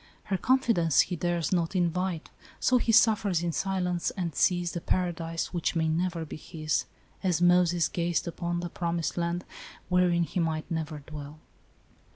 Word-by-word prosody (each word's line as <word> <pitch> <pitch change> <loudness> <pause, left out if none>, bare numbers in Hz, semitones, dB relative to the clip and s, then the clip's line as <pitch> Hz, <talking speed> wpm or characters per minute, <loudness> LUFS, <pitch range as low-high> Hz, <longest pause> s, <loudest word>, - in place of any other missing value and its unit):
Her 195 - -1
confidence 225 - +3
he 180 - -2
dares 175 +1 -1
not 170 +1 0
invite, 180 -1 -1 0.3
so 255 -1 +3
he 235 - +1
suffers 215 -6 +4
in 170 - 0
silence, 180 -1 -1
and 175 -4 -3
sees 175 +2 +2
the 170 - -4
paradise 165 -2 -1
which 175 0 -1
may 160 -1 +1
never 170 +1 -1
be 155 - -8
his, 155 -1 -2 0.4
as 180 -4 +1
Moses 175 -1 +4
gazed 170 -2 -1
upon 175 0 -2
the 175 - -4
promised 170 -2 -2
land, 175 +1 -2 0.4
wherein 180 -1 +3
he 175 - -3
might 160 -2 -1
never 155 -2 -3
dwell." 150 -1 -8
175 Hz, 160 wpm, -28 LUFS, 165-180 Hz, 0.4 s, suffers